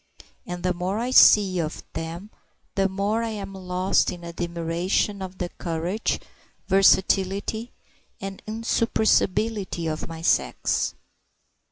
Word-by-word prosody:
And 180 Hz, 0 st, -5 dB
the 180 Hz, 0 st, +1 dB
more 180 Hz, +3 st, -2 dB
I 240 Hz, +3 st, -2 dB
see 195 Hz, -7 st, +7 dB
of 160 Hz, -1 st, -3 dB
them 170 Hz, +6 st, -6 dB, 0.4 s
the 195 Hz, 0 st, +1 dB
more 200 Hz, +4 st, 0 dB
I 230 Hz, -, -2 dB
am 200 Hz, -3 st, -6 dB
lost 185 Hz, 0 st, +1 dB
in 175 Hz, -1 st, -9 dB
admiration 170 Hz, +3 st, -1 dB
of 185 Hz, 0 st, -7 dB
the 175 Hz, -, -3 dB
courage, 175 Hz, +5 st, -2 dB, 0.5 s
versatility, 195 Hz, +3 st, +2 dB, 0.5 s
and 195 Hz, 0 st, -6 dB
insuppressibility 220 Hz, -4 st, +1 dB
of 155 Hz, -1 st, -3 dB
my 165 Hz, 0 st, -8 dB
sex. -, -, +1 dB
190 Hz, 120 wpm, -25 LUFS, 175-205 Hz, 0.5 s, see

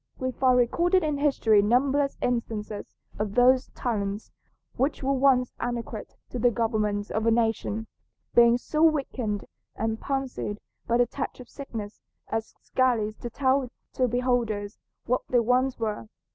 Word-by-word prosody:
We 255 Hz, 0 st, -2 dB
find 255 Hz, 0 st, +3 dB
recorded 345 Hz, +9 st, +3 dB
in 300 Hz, -2 st, -1 dB
history 230 Hz, -8 st, +4 dB
numberless 275 Hz, +6 st, +2 dB
instances 220 Hz, -4 st, -3 dB, 0.2 s
of 210 Hz, -1 st, -2 dB
those 255 Hz, +1 st, +5 dB
talents, 205 Hz, -4 st, -3 dB, 0.4 s
which 270 Hz, +3 st, -1 dB
were 275 Hz, +1 st, +2 dB
once 260 Hz, -2 st, +3 dB
adequate 235 Hz, -2 st, -4 dB, 0.2 s
to 250 Hz, -, -4 dB
the 245 Hz, +1 st, +4 dB
government 215 Hz, -3 st, -1 dB
of 220 Hz, +1 st, 0 dB
a -, -, +6 dB
nation, 225 Hz, -1 st, 0 dB, 0.5 s
being 235 Hz, 0 st, +6 dB
so 305 Hz, +5 st, -2 dB
weakened 270 Hz, -9 st, +1 dB, 0.3 s
and 225 Hz, 0 st, -2 dB
palsied 270 Hz, -6 st, -3 dB, 0.3 s
by 235 Hz, -, +3 dB
the 245 Hz, -, +4 dB
touch 240 Hz, -, -5 dB
of 250 Hz, -, -11 dB
sickness 225 Hz, -7 st, -7 dB, 0.3 s
as 225 Hz, 0 st, -3 dB
scarcely 235 Hz, -5 st, +1 dB
to 240 Hz, -, -7 dB
tell 265 Hz, +1 st, +1 dB, 0.2 s
to 255 Hz, -, +2 dB
beholders 235 Hz, -4 st, -1 dB, 0.3 s
what 250 Hz, +1 st, +1 dB
they 245 Hz, -, +4 dB
once 250 Hz, +3 st, +2 dB
were. 210 Hz, -, -3 dB
240 Hz, 145 wpm, -26 LUFS, 220-260 Hz, 0.5 s, a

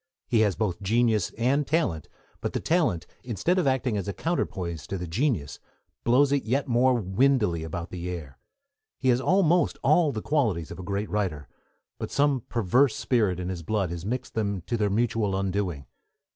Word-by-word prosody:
He 115 Hz, -, +2 dB
has 105 Hz, -3 st, +3 dB
both 105 Hz, -6 st, -2 dB
genius 110 Hz, -1 st, +2 dB
and 135 Hz, +5 st, +1 dB
talent, 150 Hz, -, 0 dB, 0.3 s
but -, -, -3 dB
the -, -, 0 dB
talent, 155 Hz, -, +1 dB, 0.2 s
instead 130 Hz, -, 0 dB
of 170 Hz, -, +1 dB
acting 130 Hz, -4 st, +1 dB
as 100 Hz, -, -3 dB
a 100 Hz, -, -2 dB
counterpoise 90 Hz, -, -3 dB
to 95 Hz, -, -3 dB
the 90 Hz, -, -4 dB
genius, 85 Hz, -, -1 dB, 0.4 s
blows 135 Hz, +4 st, +4 dB
it 140 Hz, -2 st, +1 dB
yet 135 Hz, +6 st, 0 dB
more 125 Hz, +1 st, +3 dB
windily 105 Hz, -3 st, +2 dB
about 85 Hz, +2 st, -5 dB
the 90 Hz, -1 st, -5 dB
air. 80 Hz, -7 st, -7 dB, 0.6 s
He 130 Hz, -, 0 dB
has 125 Hz, +1 st, +3 dB
almost 175 Hz, 0 st, +3 dB
all 165 Hz, -4 st, +4 dB
the 110 Hz, -4 st, -5 dB
qualities 110 Hz, -, 0 dB
of -, -, -8 dB
a -, -, -6 dB
great 100 Hz, +3 st, -3 dB
writer, 95 Hz, -9 st, -2 dB, 0.5 s
but -, -, -4 dB
some 140 Hz, -2 st, +2 dB
perverse 120 Hz, +3 st, +3 dB
spirit 105 Hz, -8 st, +1 dB
in 90 Hz, 0 st, -3 dB
his 90 Hz, -2 st, -4 dB
blood 95 Hz, 0 st, -1 dB
has 85 Hz, -1 st, -5 dB
mixed 125 Hz, +6 st, -4 dB
them 100 Hz, -4 st, -1 dB
to 120 Hz, -, -3 dB
their 105 Hz, -3 st, +1 dB
mutual 110 Hz, -2 st, 0 dB
undoing. 95 Hz, -7 st, -2 dB
110 Hz, 185 wpm, -26 LUFS, 90-130 Hz, 0.6 s, blows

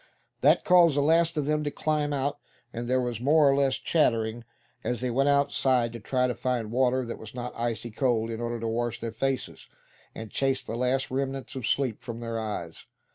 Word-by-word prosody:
That -, -, +4 dB
caused 175 Hz, -5 st, +5 dB
the -, -, +4 dB
last 165 Hz, +2 st, +3 dB
of 150 Hz, -, 0 dB
them 150 Hz, +1 st, 0 dB
to 145 Hz, -, -1 dB
climb 150 Hz, 0 st, -1 dB
out, 140 Hz, +1 st, -1 dB, 0.3 s
and 120 Hz, +1 st, -4 dB
there 130 Hz, +1 st, +2 dB
was 120 Hz, -2 st, -3 dB
more 150 Hz, +3 st, +5 dB
or 135 Hz, -, +4 dB
less 135 Hz, -2 st, +2 dB
chattering 120 Hz, -6 st, +1 dB, 0.4 s
as 120 Hz, -2 st, -2 dB
they 125 Hz, 0 st, -2 dB
went 135 Hz, +4 st, +2 dB
outside 135 Hz, -4 st, +2 dB
to 115 Hz, -, -6 dB
try 125 Hz, +4 st, 0 dB
and 125 Hz, -, -1 dB
find 120 Hz, -4 st, -2 dB
water 130 Hz, +1 st, +2 dB
that 115 Hz, -, -6 dB
was 110 Hz, +2 st, -10 dB
not 125 Hz, 0 st, -5 dB
icy 115 Hz, -1 st, -3 dB
cold, 115 Hz, -1 st, 0 dB
in 115 Hz, +1 st, -5 dB
order 120 Hz, 0 st, -3 dB
to 115 Hz, -, -3 dB
wash 120 Hz, +1 st, -2 dB
their 115 Hz, 0 st, -4 dB
faces, 135 Hz, +4 st, -3 dB, 0.5 s
and 110 Hz, -2 st, -8 dB
chase 135 Hz, -1 st, 0 dB
the 115 Hz, -, -5 dB
last 125 Hz, +2 st, 0 dB
remnants 135 Hz, 0 st, -3 dB
of 130 Hz, -4 st, -3 dB
sleep 130 Hz, -6 st, 0 dB
from 120 Hz, -3 st, -6 dB
their 115 Hz, -1 st, -4 dB
eyes. 105 Hz, -7 st, -5 dB
125 Hz, 210 wpm, -27 LUFS, 115-140 Hz, 0.5 s, caused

